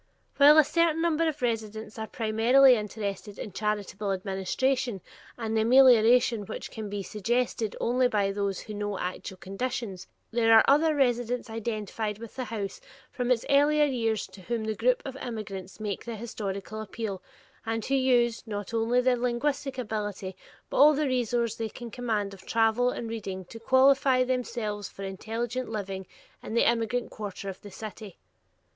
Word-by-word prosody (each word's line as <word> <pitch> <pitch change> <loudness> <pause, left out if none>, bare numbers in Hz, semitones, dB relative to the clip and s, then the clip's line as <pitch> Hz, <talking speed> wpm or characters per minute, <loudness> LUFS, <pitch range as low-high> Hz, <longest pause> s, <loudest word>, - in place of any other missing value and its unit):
While 295 +2 +8
a 310 - +9
certain 330 +1 +2
number 330 -1 +2
of 310 -2 -1
the 250 - -1
residents 220 -1 -4
are 220 - -4
primarily 235 +5 +5
interested 205 -2 -4
in 210 - -6
charitable 205 0 -2
administration 195 +5 -1 0.4
and 225 -2 -3
the 220 - +3
amelioration 240 -2 +5
which - - -6
can 215 -2 -6
be 200 -1 -4
suggested 225 +1 -1
only 250 +1 +2
by 205 -4 +1
those 200 -1 -2
who 215 - -8
know 205 -1 -3
actual 185 +1 -5
conditions, 195 -1 -4 0.2
there 225 -1 +4
are - - +7
other 305 +3 +4
residents 245 -3 0
identified 215 -1 -3
with 230 0 -10
the 255 -1 -3
House 210 -4 -5 0.3
from 245 -1 -2
its 250 -2 +2
earlier 295 +2 +4
years 225 -6 0
to 195 - -14
whom 230 +4 -3
the 220 0 -1
groups 245 +4 +1
of 270 -1 -6
immigrants 210 -7 -6
make 210 -3 -4
the 235 -1 -5
historic 205 -3 -5
appeal, 215 -2 -5 0.4
and 225 -1 -2
who 275 - -2
use, 245 -3 +3
not 205 0 -5
only 230 +2 +2
their 250 0 +3
linguistic 260 +3 -1
ability, 205 -5 -4 0.4
but - - -2
all 295 +2 +7
the 305 +1 +1
resource 240 -3 0
they 225 -1 -3
can 235 +1 -9
command 215 -4 -2
of 190 -1 -13
travel 225 +2 +3
and 235 - -4
reading 195 -5 -5
to 225 +6 -11
qualify 260 +1 +4
themselves 235 -5 -2
for 195 - -9
intelligent 225 +6 -4
living 195 -3 -5 0.3
in 220 - -6
the 235 - +4
immigrant 235 +1 0
quarter 200 -2 -6
of 190 - -8
the 205 - -10
city. 210 -1 -9
225 Hz, 170 wpm, -28 LUFS, 205-250 Hz, 0.4 s, a